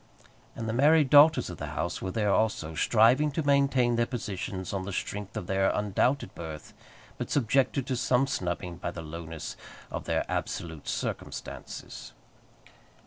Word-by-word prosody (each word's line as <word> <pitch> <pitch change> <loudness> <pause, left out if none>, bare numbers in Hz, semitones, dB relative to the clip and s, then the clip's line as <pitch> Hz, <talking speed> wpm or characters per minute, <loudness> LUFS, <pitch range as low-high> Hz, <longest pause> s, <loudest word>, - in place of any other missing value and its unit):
And 115 - -4
the 110 - -1
married 145 +2 +4
daughters 145 - +7
of 90 - -8
the 75 - -4
house 85 +5 -2
were 95 - -3
there 105 0 +1
also, 100 -8 0
striving 115 - +4
to 160 - -1
maintain 135 -4 +3
their 120 0 +2
positions 95 -6 -4
on 95 - -1
the 100 - -5
strength 105 +3 -4
of 105 - -4
their 95 +1 +2
undoubted 105 +3 0
birth, 80 -3 -8 0.5
but - - -3
subjected 135 +1 +2
to 130 -1 -1
some 125 +2 +2
snubbing 90 -6 -3
by 85 - -3
the 85 -1 -7
lowness 80 0 -7 0.4
of - - -5
their - - 0
absolute 80 -3 -4
circumstances. - - -5
105 Hz, 155 wpm, -28 LUFS, 90-130 Hz, 0.5 s, daughters